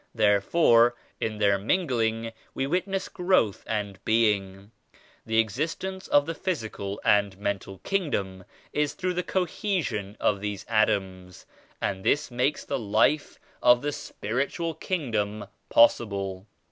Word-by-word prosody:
Therefore 115 - +4 0.2
in 110 -1 -2
their 100 -2 +3
mingling 115 - 0 0.2
we 135 - 0
witness 185 +5 -1
growth 180 - +1
and 100 -3 -3
being. 100 -3 +1 0.6
The 110 0 0
existence 160 - -1
of 145 0 +4
the 165 - -3
physical 110 - -4
and 100 -2 +3
mental 100 -1 -3
Kingdom 100 - -2 0.3
is 150 -1 0
through 185 -1 -1
the 180 - 0
co 185 +1 0
hesion 155 - -3
of 100 -2 +1
these 105 -1 -4
atoms 95 -5 0 0.3
and 95 -1 -2
this 145 +3 +1
makes 125 +4 0
the - - -2
Life 120 +7 +1 0.2
of 120 +1 +5
die 145 - 0
Spiritual 140 - -3
Kingdom 110 - -2 0.2
possible. 100 -4 +2
115 Hz, 125 wpm, -26 LUFS, 100-150 Hz, 0.6 s, of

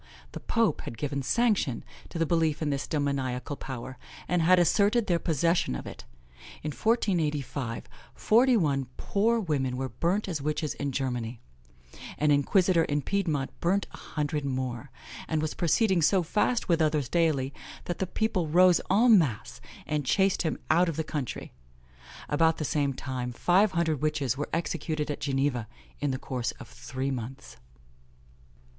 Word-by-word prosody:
The - - -7
pope 230 -2 +1
had 115 - -7
given 140 +2 -2
sanction 205 - +1 0.3
to - - -6
the 165 - +2
belief 160 -2 +1
in 150 - 0
this 140 0 -2
demoniacal 140 -3 -2
power, 130 -1 -7 0.3
and 180 -1 +1
had 180 +3 +5
asserted 205 +6 +3
their 175 -3 +1
possession 165 - +1
of - - -6
it. - - -9 0.6
In 150 - -2
1485, 150 - -1 0.3
forty 245 +3 +4
one 140 - 0
poor 230 +4 +1
women 135 - -1
were 130 0 -3
burnt 185 +9 -1
as 165 -6 -3
witches 150 +1 -1
in 145 -1 -3
Germany; 125 -3 -3 0.8
an 150 0 +2
inquisitor 170 +4 +3
in 145 -1 -1
Piedmont 160 -9 -1
burnt 190 +3 +1
a - - -11
hundred 150 -1 -3
more, 130 -1 -3 0.4
and 160 - 0
was 155 0 -2
proceeding 180 +2 +2
so 185 +4 +3
fast 210 +8 0
with 170 -2 +2
others 150 -4 +1
daily, 150 -5 +1 0.3
that 175 - -4
the 190 - -1
people 185 -4 -1
rose 180 +3 +5
en 220 +2 +6
masse, 130 - -3 0.2
and 150 -1 -1
chased 190 +8 +2
him 160 - -1
out 170 +2 +4
of 165 - -3
the 160 - -1
country. 145 -5 -5 0.7
About 160 +2 +2
the 155 - -3
same 140 -2 0
time, 125 -2 -4
five 185 - +3
hundred 160 -5 0
witches 150 -5 0
were 145 +2 -4
executed 155 -2 -2
at - - -5
Geneva, 135 -4 0 0.3
in 145 - 0
the 130 - -1
course 125 -2 -3
of - - -12
three 130 +2 -4
months. 120 - -7
150 Hz, 160 wpm, -28 LUFS, 135-175 Hz, 0.8 s, en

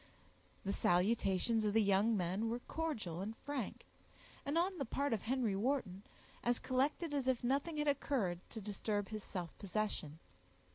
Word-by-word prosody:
The 195 - 0
salutations 195 +4 +3
of 210 -1 +1
the 220 0 +5
young 200 +3 +4
men 190 +5 0
were 235 - 0
cordial 225 - -3
and 215 +3 -4
frank, 280 -6 -4 0.6
and, 285 +4 0
on 360 +1 +1
the - - +1
part 280 +3 0
of 215 - 0
Henry 240 -4 +1
Wharton, 210 -4 0 0.4
as 240 0 +3
collected 285 +5 0
as 275 -3 0
if 255 -2 +2
nothing 280 +6 +1
had 300 0 +1
occurred 255 -11 +1
to 225 - -6
disturb 205 0 -2
his 215 -2 -4
self 175 -4 -5
possession. 200 -7 -2
225 Hz, 160 wpm, -37 LUFS, 195-275 Hz, 0.6 s, the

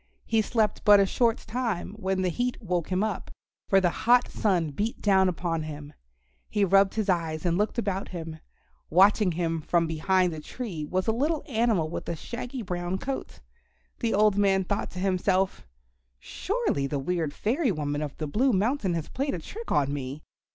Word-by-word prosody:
He 225 -1 +2
slept 215 -1 0
but 205 -1 +7
a 200 - +5
short 230 +3 +2
time 225 -5 -3
when 190 -3 -1
the 185 - +2
heat 245 +8 -2
woke 180 -6 -2
him 185 +2 +1
up, 215 -4 -3 0.4
for 195 - +6
the 180 -2 +2
hot 245 +6 +3
sun 175 -7 0
beat 210 +11 -3
down 190 -2 +4
upon 170 -2 -2
him. 150 -1 -7 0.6
He 205 -2 +2
rubbed 195 +1 +4
his 215 -2 -1
eyes 165 -4 -1
and 170 -1 +2
looked 210 +6 0
about 200 -4 -1
him. 165 -3 -7 0.5
Watching 195 +2 +4
him 165 -1 -1
from 170 +2 +1
behind 175 +3 +1
a 155 - -6
tree 170 -2 -6
was 185 +4 -1
a 225 - +2
little 295 +7 0
animal 220 - +1
with 160 - -5
a 170 - -1
shaggy 245 - -6
brown 180 0 -3
coat. 270 +5 -5 0.6
The 230 -4 0
old 210 -1 +4
man 195 -1 +3
thought 200 +3 -2
to 180 - -6
himself, 190 - 0 0.5
"Surely 380 - -2
the 145 - -2
weird 160 +2 -1
fairy 245 - 0
woman 145 -3 -2
of 145 -2 -5
the 155 - -3
Blue 240 - +2
Mountain 205 -2 +1
has 160 -2 -3
played 275 -1 -2
a - - -4
trick 445 - -8
on 140 -1 +2
me. 140 +1 -5
190 Hz, 185 wpm, -27 LUFS, 165-220 Hz, 0.6 s, but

